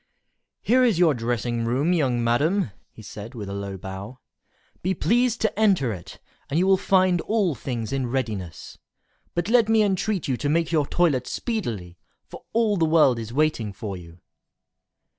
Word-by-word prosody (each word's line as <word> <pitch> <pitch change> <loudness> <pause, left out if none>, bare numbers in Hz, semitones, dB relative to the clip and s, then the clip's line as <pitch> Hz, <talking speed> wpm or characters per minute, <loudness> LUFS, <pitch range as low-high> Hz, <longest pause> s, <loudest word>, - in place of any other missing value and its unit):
"Here 255 +3 +4
is 230 -8 +3
your 170 -3 +4
dressing 120 -1 -2
room, 135 +9 +1
young 130 -8 +1
madam," 145 - +1 0.2
he 110 - -14
said, 110 +2 -9
with 105 -4 -6
a - - -5
low 100 -1 -5
bow; 95 +6 -8 0.6
"be 185 +2 0
pleased 240 +5 +1
to 220 -1 0
enter 185 - +3
it, 85 -4 -10 0.3
and 145 - -1
you 180 - +3
will 195 0 +5
find 185 -2 +2
all 205 -6 +1
things 120 -2 -4
in 135 -2 -1
readiness. 110 -9 -4 0.6
But 175 +1 -1
let 230 -1 +4
me 220 -1 +4
entreat 195 -1 0
you 130 -3 0
to 145 - -2
make 165 +2 +1
your 150 -4 +2
toilet 145 -8 +1
speedily, 110 - -4 0.3
for - - -12
all 220 -3 +2
the 165 - +3
world 155 -7 +4
is 115 0 -6
waiting 135 -6 0
for 100 -1 -6
you." 85 -1 -12
140 Hz, 175 wpm, -24 LUFS, 115-190 Hz, 0.6 s, will